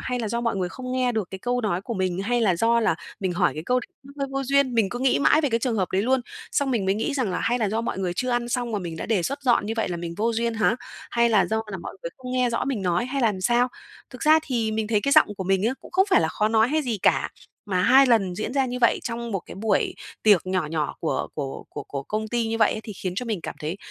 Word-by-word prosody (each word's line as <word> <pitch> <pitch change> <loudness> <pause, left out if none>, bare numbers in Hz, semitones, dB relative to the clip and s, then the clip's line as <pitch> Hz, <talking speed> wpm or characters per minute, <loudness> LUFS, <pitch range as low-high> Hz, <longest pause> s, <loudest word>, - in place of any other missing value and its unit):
hay 250 -1 -2
là 225 -3 -2
do 235 +2 -1
mọi 230 -4 -1
người 180 -2 -1
không 255 +6 -6
nghe 255 -1 +1
được 220 -5 -2
cái 190 - -6
câu 245 +4 -1
nói 205 -6 -1
của 235 - -4
mình, 185 -2 -1
hay 240 +4 +1
là 190 -6 +3
do 230 +4 +3
là 215 -6 +2 0.3
mình 190 -2 -1
hỏi 175 - +1
cái 155 - -5
câu 250 0 +2
đấy - - -11 0.2
nó 275 - -13
hơi 275 - -1
vô 275 0 -1
duyên, 275 -1 +2
mình 225 -4 +3
cứ 245 - -5
nghĩ 260 +1 +2
mãi 305 +2 +4
về 295 - +1
cái 230 - +2
trường 235 -2 0
hợp 185 -3 0
đấy 190 - +2
luôn. 260 +3 +2 0.3
Xong 280 -1 +1
mình 230 -6 0
mới 190 +1 +2
nghĩ 225 +7 -2
rằng 255 -8 0
là 180 - -2
"Hay 240 +2 +1
là 220 -4 +1
do 220 +3 -1
mọi 230 - -3
người 185 -2 -1
chưa 255 +7 -1
ăn 240 0 0
xong 240 -1 -2
mà 210 - 0
mình 170 -3 -6
đã - - -5
đề 215 -6 +1
xuất 275 - -3
dọn 240 -5 +3
như 220 - -2
vậy 225 - 0
là 175 - -3
mình 170 0 -5
vô 230 +3 +1
duyên 230 0 -1
hả? 220 +1 +2 0.3
Hay 235 0 +3
là 200 -5 +4
do 220 +3 -1
là 190 - -4
mọi - - -8
người 170 - -4
không 250 -1 -7
nghe 250 -1 +2
rõ 230 - -1
mình 255 -7 -2
nói 180 +3 +1
hay 270 +1 -2
là 230 - +5
làm 190 - -7
sao". 240 +5 +3 0.4
Thực - - -9
ra 310 +1 +6
thì 230 -7 -1
mình 220 0 -1
thấy 215 -2 +2
cái 280 +5 0
giọng 310 - +6
của 190 - -4
mình 190 +1 +1
á 245 - 0
cũng - - -13
không 380 +2 +4
phải - - +6
là 160 - +1
khó 210 +6 0
nói 220 +1 +3
hay 310 +3 +1
gì 235 -6 -2
cả, - - +3 0.4
mà 180 -1 +2
hai 265 +7 +6
lần 200 -7 +2
diễn 215 +5 -4
ra 270 -1 +2
như 250 0 -4
vậy 235 - +3
trong 235 0 -4
một 195 - -1
cái - - -9
buổi 205 +1 0 0.3
tiệc 205 -5 +5
nhỏ 185 -3 0
nhỏ 155 -1 -2
của 160 - -1
của 140 -3 -5
của - - -6
của 140 -1 -5
công 215 +8 -3
ty 235 0 0
như 225 0 -2
vậy - - +4
ấy 215 - -5
thì 215 - -7
khiến 185 -1 -4
cho 250 - -2
mình 215 -6 -2
cảm - - -5
thấy 155 +4 -3
225 Hz, 315 wpm, -24 LUFS, 190-250 Hz, 0.4 s, ra